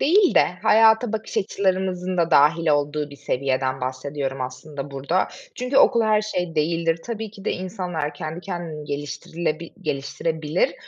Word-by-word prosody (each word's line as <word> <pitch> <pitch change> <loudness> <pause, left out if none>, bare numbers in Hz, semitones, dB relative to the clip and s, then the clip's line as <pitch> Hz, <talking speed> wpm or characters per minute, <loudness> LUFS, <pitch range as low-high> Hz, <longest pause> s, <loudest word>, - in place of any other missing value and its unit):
değil 370 +5 +4
de - - +7 0.2
hayata 220 +1 +5
bakış 220 0 -4
açılarımızın 185 -2 0
da 170 -1 +2
dâhil 155 +2 +5
olduğu 145 0 +1
bir 140 - -11
seviyeden 130 -1 -1
bahsediyorum 135 +1 -3
aslında 135 +3 -6
burada. 140 +7 0 0.3
Çünkü 250 +2 -2
okul 235 - +6
her 215 -1 +3
şey 180 -5 -3
değildir. 165 +1 +1
Tabii 220 -2 -4
ki 200 -2 -13
de - - +1
insanlar 180 -5 -3
kendi 160 0 -5
kendini 175 -5 -5
geliştirilebil 155 +3 -3
geliştirebilir. 155 +5 -1
165 Hz, 145 wpm, -23 LUFS, 145-190 Hz, 0.3 s, de